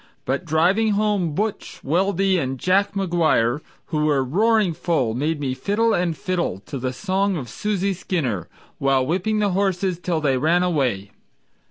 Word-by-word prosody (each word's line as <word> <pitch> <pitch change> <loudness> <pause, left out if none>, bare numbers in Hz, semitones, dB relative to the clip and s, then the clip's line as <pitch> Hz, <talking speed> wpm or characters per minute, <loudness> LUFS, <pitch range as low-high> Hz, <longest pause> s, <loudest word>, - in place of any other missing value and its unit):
But 135 +7 -1
driving 185 +8 +2
home 200 -6 0
"Butch" 210 +3 -3
Weldy 190 +4 +1
and 135 -2 -2
Jack 190 +8 +1
McGuire, 160 -9 +1 0.3
Who 150 -1 +1
were 145 -3 +2
roaring 205 - +2
full, 155 -8 0
made 150 +5 -1
me 135 -3 -2
fiddle 220 - +1
and 175 -4 0
fiddle 175 - -2
To 140 - -5
the 130 0 -2
song 195 +6 0
of 130 -5 -5
Susie 200 -2 -1
Skinner, 140 - -2 0.3
while 135 -1 +2
whipping 190 +8 0
the 205 -2 +1
horses 185 -2 0
Till 175 -2 -1
they 140 -4 +1
ran 170 +5 +3
away. 130 - 0
175 Hz, 160 wpm, -22 LUFS, 140-195 Hz, 0.3 s, ran